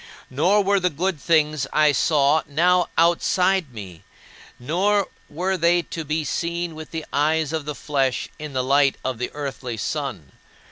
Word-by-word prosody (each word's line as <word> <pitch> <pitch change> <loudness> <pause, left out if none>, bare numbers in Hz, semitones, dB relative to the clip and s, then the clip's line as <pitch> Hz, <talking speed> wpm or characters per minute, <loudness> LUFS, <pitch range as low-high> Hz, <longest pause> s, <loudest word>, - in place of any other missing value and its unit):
Nor 180 +10 +3
were 200 +1 +2
the 180 -1 +1
good 170 0 -2
things 155 -4 +2
I 150 -1 +4
saw 145 +2 +3
now 175 +5 +2
outside 175 0 +2
me, 95 -7 -10 0.6
nor 190 +10 0 0.2
were 185 +4 -1
they 170 +1 +3
to 165 - -6
be 155 +1 -2
seen 170 +3 -3
with 155 0 -9
the 160 -1 -5
eyes 155 +1 +1
of 155 -2 -3
flesh 135 -3 -1
in 150 -2 -7
the 130 -1 0
light 140 +1 +3
of 130 -3 -2
the 125 - -2
earthly 135 -5 -5
sun. 110 - -4
155 Hz, 155 wpm, -22 LUFS, 140-175 Hz, 0.6 s, I